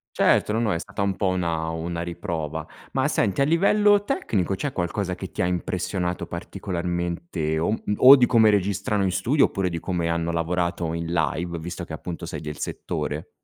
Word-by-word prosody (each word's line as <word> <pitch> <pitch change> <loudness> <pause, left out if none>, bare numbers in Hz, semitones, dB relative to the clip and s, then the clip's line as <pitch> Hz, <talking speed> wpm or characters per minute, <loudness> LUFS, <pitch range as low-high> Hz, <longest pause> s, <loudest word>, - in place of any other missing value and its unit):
Certo! - - +3
No, 110 - +1
no, 115 -3 +1
è 85 - -1
stata 85 - -6
un 100 -1 +1
po' 95 - 0
una 85 -3 -1
una 85 +1 -3
riprova. 85 -3 -4 0.3
Ma - - +2
senti, 100 +6 +1
a - - +6
livello 205 +6 +4
tecnico, 100 - -1
c'è 135 +7 -3
qualcosa 90 +1 -2
che 95 +1 -7
ti - - -3
ha - - +2
impressionato 90 0 -2
particolarmente 85 -2 -3
o 80 - 0
um 110 - +1 0.2
o 135 +2 +10
di 130 -3 +4
come 115 -3 +5
registrano 100 0 +1
in 95 - +1
studio 120 - +3
oppure 95 -2 -1
di 85 -1 -4
come 85 -1 -2
hanno 85 0 0
lavorato 85 0 -1
in 85 0 -3
live, 85 +1 -1
visto 85 +2 -6
che 80 - -9
appunto 85 +2 -6
sei - - -6
del 75 -1 -6
settore? - - -4
90 Hz, 190 wpm, -24 LUFS, 85-100 Hz, 0.3 s, o